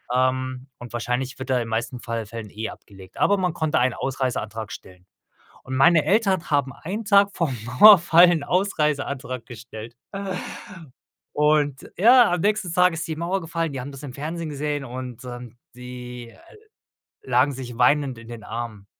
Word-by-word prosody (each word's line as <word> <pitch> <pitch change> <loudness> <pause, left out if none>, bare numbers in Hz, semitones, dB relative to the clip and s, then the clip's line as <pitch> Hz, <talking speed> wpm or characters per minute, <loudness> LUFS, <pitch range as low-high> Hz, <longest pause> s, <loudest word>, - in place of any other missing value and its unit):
Ähm, 130 0 0
und 120 -1 -11
wahrscheinlich 125 +3 -2
wird 130 0 -7
da 130 - +2
in 125 - +1
den 115 - -9
meisten 115 +2 -3
Fall 115 -2 -4
Fällen, 110 0 -8
eh, 110 +2 -5
abgelegt. 95 -2 -14
Aber 205 - +3
man 180 -3 0
konnte 155 -1 0
einen 125 -1 +2
Ausreiseantrag 120 -6 -3
stellen. 90 0 -12 0.6
Und 130 0 -5
meine 155 +4 +5
Eltern 195 -4 +2
haben 140 -3 +1
einen 205 - -6
Tag 200 -1 +4
vorm 155 -7 0 0.3
Mauerfall 175 -4 +8
'n 160 -4 0
Ausreiseantrag 145 -9 -1
gestellt. 115 -1 -10 1.4
Und 150 -2 +1
ja, 235 -1 +6
am 175 - 0
nächsten 205 -3 0
Tag 180 -1 +4
ist 165 - -4
die 160 - -4
Mauer 175 +4 -1
gefallen, 165 -2 -3
die 130 - -4
haben 140 +2 -8
das 135 - -11
im 135 -4 -8
Fernsehen 160 +3 -5
gesehen 145 -1 -3
und, 125 -1 -7
ähm, 120 -1 -9 0.2
die, 125 -1 -9
äh, 340 - -19 0.7
lagen 145 - +3
sich 125 -3 -7
weinend 130 -1 +2
in 115 - -13
den 115 -3 -9
Armen. 110 -3 -6
135 Hz, 170 wpm, -23 LUFS, 120-165 Hz, 1.4 s, Mauerfall